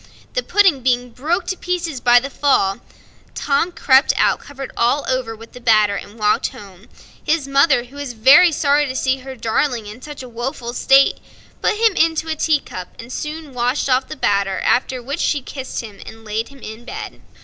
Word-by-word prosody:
The - - 0
pudding 385 - +3
being 245 -1 0
broke 330 +10 -2
to 375 - -2
pieces 340 -7 -3
by 245 0 +6
the 275 +3 -7
fall, 200 -10 +1 0.6
Tom 290 +5 0
crept 270 -4 +4
out - - +2
covered 275 -2 -9
all 245 +5 +1
over 255 -3 -2
with 225 +1 -14
the 250 - -12
batter, 215 -3 +3
and 205 +2 -8
walked 210 -1 +1
home. 195 0 -13 0.4
His 305 -3 0
mother, 275 -2 +3
who 255 +4 -15
was 285 -3 -5
very 270 +10 +6
sorry 290 -1 +2
to 260 - -5
see 265 0 +1
her 265 0 -9
darling 230 0 -1
in 210 +4 -10
such 295 -2 -9
a - - -9
woeful 240 0 -5
state, 270 +2 +4 0.4
put - - +1
him 450 -1 +3
into 325 -1 +1
a 315 - -1
teacup 290 - -1
and 235 +2 -9
soon 305 -2 -6
washed 250 +3 -1
off 255 +1 +2
the - - -7
batter; 200 -4 0
after 250 0 0
which 280 +6 -4
she 290 - +1
kissed 265 0 -6
him 215 -4 -11
and 225 0 -12
laid 220 +2 -3
him 275 -2 -16
in 220 +2 -8
bed. - - -8
260 Hz, 195 wpm, -19 LUFS, 230-290 Hz, 0.6 s, by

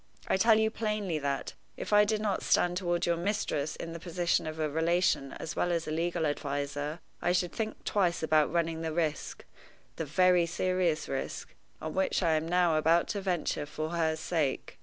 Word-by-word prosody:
I - - +2
tell 220 +3 +5
you 220 0 +2
plainly 210 -7 -2
that, 140 -1 -2 0.2
if - - -4
I 210 0 +7
did 215 0 0
not 205 -3 0
stand 175 0 +2
toward 175 -1 0
your 170 -1 +1
mistress 170 -6 -1
in 165 - -6
the 170 - -6
position 175 -1 0
of 155 0 -5
a 155 - +1
relation 160 -2 +1
as 165 - -6
well 175 - +1
as 170 -1 -1
a - - -3
legal 170 +1 0
adviser, 145 +2 -3 0.2
I 175 - +2
should 180 -1 +1
think 220 -1 -4
twice 180 -5 +1
about 155 -2 +3
running 165 -1 0
the 160 -1 -3
risk 155 -3 -2 0.5
the 160 - -2
very 180 +3 +4
serious 175 -2 0
risk 135 - -4 0.3
on 155 0 -5
which 190 0 +1
I 165 - +3
am 155 +1 +1
now 175 -2 +3
about 165 +2 +3
to 205 -3 -2
venture 175 -5 -1
for 155 +1 -4
her 160 -2 0
sake. 160 -3 -2
170 Hz, 195 wpm, -30 LUFS, 155-180 Hz, 0.5 s, I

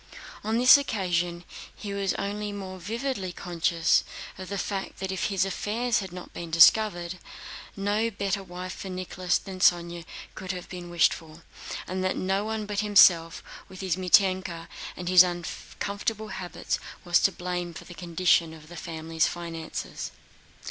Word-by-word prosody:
On 220 +2 0
this 255 +4 +8
occasion, 175 -8 -1 0.3
he 205 -2 -6
was 200 -1 0
only 205 +1 -3
more 190 -2 -7
vividly 220 0 -3
conscious 170 -1 +1 0.3
of 185 0 -8
the 200 - -3
fact 195 +1 -3
that 190 0 -3
if 190 - -1
his 195 -2 +1
affairs 220 +5 0
had 190 -3 -6
not 180 0 -9
been 170 - -5
in - - -10
disorder, 175 +2 +5 0.7
no 205 +3 +1
better 200 -2 -2
wife 180 0 -7
for 190 - -7
Nicholas 185 0 -1
than 190 -2 -8
Sónya 170 -2 +3 0.3
could 190 0 -5
have 180 -1 -7
been 175 -1 -7
wished 175 -1 +4
for, 160 0 -11 0.4
and 185 +1 -3
that 185 - 0
no 195 +2 0
one 220 0 -3
but 205 -1 -2
himself 180 -6 +5 0.3
with 190 0 -9
his 185 -3 0
Mítenka 185 -2 +2 0.3
and 180 - -6
his 180 -1 +9
uncomfortable 200 +4 -2
habits 185 -2 -3 0.3
was 175 -1 +4
to 195 - +3
blame 180 -1 -3
for 165 - -9
the 175 - -10
condition 170 -1 +2
of 155 0 -15
the 175 - -10
family 160 0 -7
finances. 165 -1 -2
185 Hz, 160 wpm, -27 LUFS, 175-200 Hz, 0.7 s, his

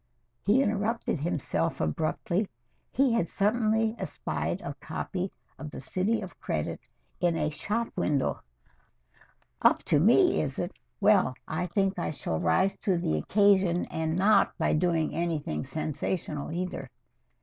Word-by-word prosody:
he 235 +7 +4
interrupted 215 - -1
himself 135 - -1
abruptly. 170 - -1 0.4
He 265 -2 +3
had 175 -8 +1
suddenly 220 +1 +1
espied - - -3
a - - -5
copy 185 0 -3 0.3
of 155 - -6
"The - - -8
City 190 +11 0
of 190 -3 -9
Credit" 75 - -2 0.4
in 175 -2 +2
a 150 -1 0
shop 220 +9 -2
window. 145 -3 0 1.2
"Up - - +4
to 145 - +3
me, 240 - +5
is 140 -3 -3
it? 175 +2 -2 0.3
Well, 195 -10 +4
I 175 +3 -2
think 195 +1 0
I - - -1
shall 80 - -3
rise 85 - +2
to 190 -3 +1
the 80 - 0
occasion 190 - +3
and 160 0 -1
not 195 +2 +4
by - - +1
doing 165 0 +1
anything 155 - -2
sensational 155 -1 -3
either." 180 +2 -4
180 Hz, 140 wpm, -28 LUFS, 155-205 Hz, 1.2 s, me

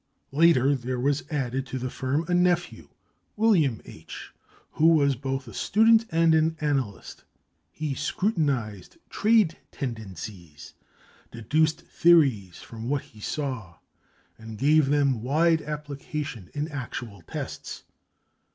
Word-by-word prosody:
Later, 145 -2 +4
there 125 -1 -3
was 140 +3 0
added 135 -3 -2
to 130 - -4
the 130 0 -4
firm 140 +5 -1
a 180 - -1
nephew, 175 -1 +1 0.5
William 175 - +2
H., - - -11 0.4
who 160 - +3
was 145 -4 +4
both 135 +1 -4
a 115 - -10
student 225 +1 +4
and 165 -1 +3
an 160 +1 +2
analyst. 135 - -3 0.5
He 155 -2 -4
scrutinized 135 - -2
trade 210 -6 +3
tendencies, 95 - -7 0.6
deduced 155 +8 0
theories 135 - +3
from 115 +1 -7
what 145 -1 0
he 110 - -18
saw, 120 - -4 0.6
and 110 -1 -9
gave 150 +3 +4
them 140 -4 +2
wide 160 +6 +2
application 150 - -6
in 145 +1 -2
actual 120 - -6
tests. 80 - -7
140 Hz, 120 wpm, -26 LUFS, 120-160 Hz, 0.6 s, Later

